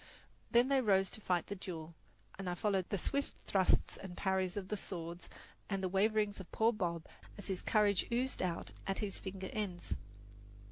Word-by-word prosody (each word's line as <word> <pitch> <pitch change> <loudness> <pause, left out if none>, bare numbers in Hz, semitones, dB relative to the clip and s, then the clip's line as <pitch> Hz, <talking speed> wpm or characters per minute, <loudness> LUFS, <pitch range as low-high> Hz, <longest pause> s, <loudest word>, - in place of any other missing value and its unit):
Then 240 +2 +6
they 275 -1 +4
rose 195 -4 +4
to 220 - -6
fight 180 -4 +1
the - - -4
duel, 170 -4 -6 0.5
and 190 -2 -2
I 175 - -1
followed 195 -1 +1
the 200 - +1
swift 280 +10 -1
thrusts 190 -2 +3
and 185 -2 -8
parries 190 0 +1
of 190 -2 -3
the 210 - 0
swords 170 -3 -5 0.4
and 195 -2 -1
the - - +3
waverings 205 +2 +2
of 190 - -9
poor 225 +2 +4
Bob 170 -6 -1 0.3
as 205 - -7
his 190 -2 -2
courage 205 -3 +3
oozed 255 +3 +1
out 175 -2 -1 0.2
at 195 - +1
his 205 -2 -2
finger 190 -1 -5
ends. 190 -5 -2
195 Hz, 185 wpm, -36 LUFS, 180-210 Hz, 0.5 s, Then